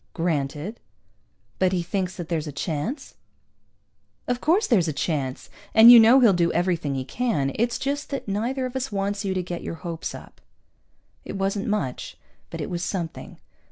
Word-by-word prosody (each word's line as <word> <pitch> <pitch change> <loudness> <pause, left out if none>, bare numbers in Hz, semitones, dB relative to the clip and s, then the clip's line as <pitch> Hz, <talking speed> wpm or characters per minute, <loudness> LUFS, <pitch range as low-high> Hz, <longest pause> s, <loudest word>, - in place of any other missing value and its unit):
"Granted." 160 +4 -2 0.8
"But 185 0 +2
he 175 -2 0
thinks 185 +1 -2
that 175 -3 -6
there's 160 -2 -2
a - - -4
chance?" 165 - -4 1.1
"Of 245 0 -1
course 365 +8 +3
there's 190 -9 +2
a 155 - -1
chance. 140 -4 -3 0.3
And 225 +2 +10
you 240 - +11
know 230 +4 +7
he'll 225 -5 +6
do 170 -1 +2
everything 170 -6 0
he 130 -1 -3
can. 180 - -1
It's 235 +1 0
just 285 +2 -3
that 275 -5 -5
neither 235 +7 -1
of 255 0 -6
us 265 -1 -3
wants 200 +1 -2
you 190 -1 -2
to 185 - -1
get 175 -1 -5
your - - -5
hopes 165 -1 -4
up." - - -13 0.8
It - - -7
wasn't 195 +1 -1
much, 205 -12 -3 0.3
but - - -7
it - - -4
was 175 0 -3
something. 170 -5 -5
190 Hz, 180 wpm, -24 LUFS, 165-235 Hz, 1.1 s, you